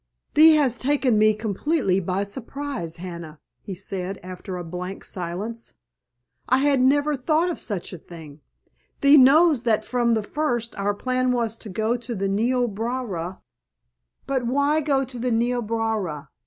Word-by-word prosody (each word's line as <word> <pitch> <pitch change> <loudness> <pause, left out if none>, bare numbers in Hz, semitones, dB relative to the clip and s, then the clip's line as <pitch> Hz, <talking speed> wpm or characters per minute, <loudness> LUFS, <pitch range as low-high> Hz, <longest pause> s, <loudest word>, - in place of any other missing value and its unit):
"Thee 315 +1 +8
has 265 -6 +2
taken 260 -5 +2
me 215 0 +4
completely 215 - 0
by 185 +2 -1
surprise, 240 - -6
Hannah!" 170 -3 -8 0.2
he 195 - -7
said 190 0 -5
after 185 +1 -7
a 175 - -5
blank 180 +3 -6
silence. 195 +6 -5 0.7
"I 255 - +5
had 275 -1 +3
never 290 +3 +3
thought 315 +6 +1
of - - -6
such 200 -4 -4
a 180 - -7
thing. 155 -3 -12 0.6
Thee 280 +1 +7
knows 295 +1 +6
that 220 -3 +1
from 240 -2 +1
the 220 - -1
first 240 -2 -2
our 200 0 -1
plan 255 +3 0
was 230 -3 0
to 220 - -8
go 220 +5 0
to 240 0 -6
the 195 0 -1
Niobrara——" 225 -4 -1 0.8
"But 260 -3 -1
why 285 +4 +2
go 275 -2 +1
to 250 -1 -8
the 250 +2 -1
Niobrara? 225 -8 -1
230 Hz, 155 wpm, -24 LUFS, 195-260 Hz, 0.8 s, Thee